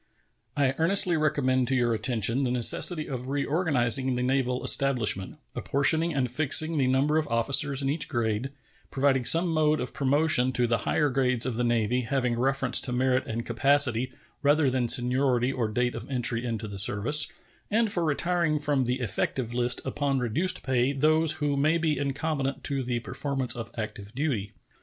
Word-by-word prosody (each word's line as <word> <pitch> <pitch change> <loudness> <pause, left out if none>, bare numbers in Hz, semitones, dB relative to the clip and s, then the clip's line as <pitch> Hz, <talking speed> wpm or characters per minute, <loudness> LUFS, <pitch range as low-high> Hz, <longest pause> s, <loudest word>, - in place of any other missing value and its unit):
I 135 -2 +1
earnestly 180 +1 +3
recommend 130 -5 0
to 135 - -1
your 120 -2 0
attention 115 +2 0
the 130 - -1
necessity 140 +6 +4
of 130 -1 -6
reorganizing 135 - +1
the 125 - -3
naval 130 -1 -1
establishment, 115 -9 +2 0.2
apportioning 160 +4 +1
and 130 -5 -2
fixing 155 +4 +3
the 130 - +1
number 140 +4 +1
of 155 - -4
officers 135 +4 +2
in 135 - -1
each 155 0 -1
grade, 115 +1 -2 0.4
providing 135 -2 0
some 170 +5 +4
mode 155 -1 +1
of 125 - -6
promotion 140 -2 +2
to 125 0 +2
the 115 -1 -1
higher 150 -2 +1
grades 125 -2 0
of 130 - -3
the 125 - -2
Navy 120 +1 0
having 125 0 -2
reference 130 0 +1
to 125 - -1
merit 130 +1 -1
and 115 +1 -5
capacity 130 0 +1 0.3
rather 145 -1 +2
than 125 -2 -1
seniority 125 0 +2
or 125 -4 -3
date 120 +3 -2
of 115 +2 -9
entry 125 -3 0
into 115 -3 -5
the 100 -1 -6
service, 115 +10 +1 0.4
and 220 0 0
for 175 - 0
retiring 165 +1 0
from 145 -3 -1
the 125 +2 -3
effective 120 +2 -3
list 120 0 0
upon 140 +1 -2
reduced 130 +10 0
pay 130 +1 0
those 155 +3 +2
who 145 -2 -2
may 155 +4 +1
be 155 -4 -2
incompetent 140 -1 -3
to 140 -1 -2
the 125 -1 -3
performance 135 0 -2
of 115 -3 -7
active 105 0 -7
duty. 125 -9 -3
130 Hz, 175 wpm, -26 LUFS, 120-145 Hz, 0.4 s, necessity